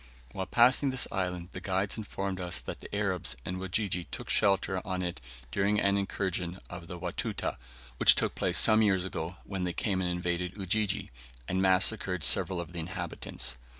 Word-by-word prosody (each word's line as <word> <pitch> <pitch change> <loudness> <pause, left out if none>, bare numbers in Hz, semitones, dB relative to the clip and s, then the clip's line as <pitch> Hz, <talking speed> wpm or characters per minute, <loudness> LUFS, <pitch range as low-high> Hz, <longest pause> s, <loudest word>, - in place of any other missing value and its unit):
While 95 +6 -4
passing 125 +4 +5
this 130 -1 +2
island 90 -2 -2
the 90 - -7
guides 95 +1 0
informed 100 -3 -4
us 90 -1 -1
that - - -7
the - - -8
Arabs 95 -10 0
and 90 +1 -3
Wajiji 95 -1 -1
took - - -4
shelter 95 -1 +2
on 95 -1 -2
it 90 -7 -4 0.3
during 100 +7 +2
an 100 0 +3
incursion 95 -3 -2
of 90 -1 -8
the 90 - -6
Watuta 85 0 -3 0.4
which - - +7
took - - 0
place - - 0
some 110 0 +6
years 95 -4 +3
ago 90 -1 -4
when 95 -2 -4
they 90 -1 -1
came 95 +1 0
and 90 - 0
invaded 90 +1 -2
Ujiji, 100 - 0 0.4
and 95 +1 0
massacred 95 -1 +3
several 90 +6 +4
of 85 0 -5
the 85 - -3
inhabitants. 65 -5 -3
95 Hz, 180 wpm, -30 LUFS, 90-100 Hz, 0.4 s, which